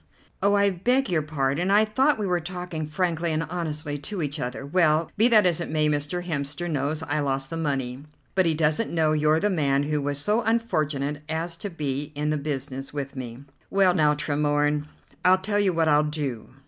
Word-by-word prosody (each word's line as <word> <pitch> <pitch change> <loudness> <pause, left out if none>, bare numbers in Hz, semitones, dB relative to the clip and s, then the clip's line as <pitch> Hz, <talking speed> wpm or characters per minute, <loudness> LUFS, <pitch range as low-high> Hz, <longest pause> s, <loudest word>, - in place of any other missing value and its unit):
"Oh, 200 +1 +3
I 200 0 +3
beg 245 +7 +1
your 165 -3 +2
pardon; 150 +3 -1
I 210 +2 +5
thought 265 +7 +2
we 210 - -2
were 180 -2 +1
talking 175 -2 -5
frankly 170 +1 -1
and 155 +1 0
honestly 155 -3 -4
to 180 +4 -4
each 145 +1 -3
other. 125 +1 -4
Well, 155 0 +2
be 220 +3 +5
that 215 -5 +5
as 175 -2 +2
it - - -4
may, 155 -1 +2
Mr. 150 +4 -1
Hemster 145 +1 -3
knows 150 0 -2
I 155 - -1
lost 135 -1 -1
the 165 - -3
money, 135 -5 -2 0.3
but 185 -2 +3
he 160 - +2
doesn't 155 +7 +1
know 160 -2 +2
you're 155 +1 +3
the 205 +4 +1
man 140 -5 +1
who 150 0 -1
was 145 0 -1
so 210 +11 +1
unfortunate 155 -11 -1
as 165 +2 -2
to 205 - -5
be 145 -4 -3
in 150 +1 -1
the 155 - 0
business 135 -2 -4
with 140 -1 -5
me." 125 0 -7 0.3
"Well 195 -2 +4
now, 150 -4 +3
Tremorne, 145 0 0 0.4
I'll 185 +1 +6
tell 205 +2 -1
you 200 -2 +3
what 165 -2 +1
I'll 150 0 +4
do. 145 -6 -3
155 Hz, 205 wpm, -25 LUFS, 145-180 Hz, 0.4 s, I'll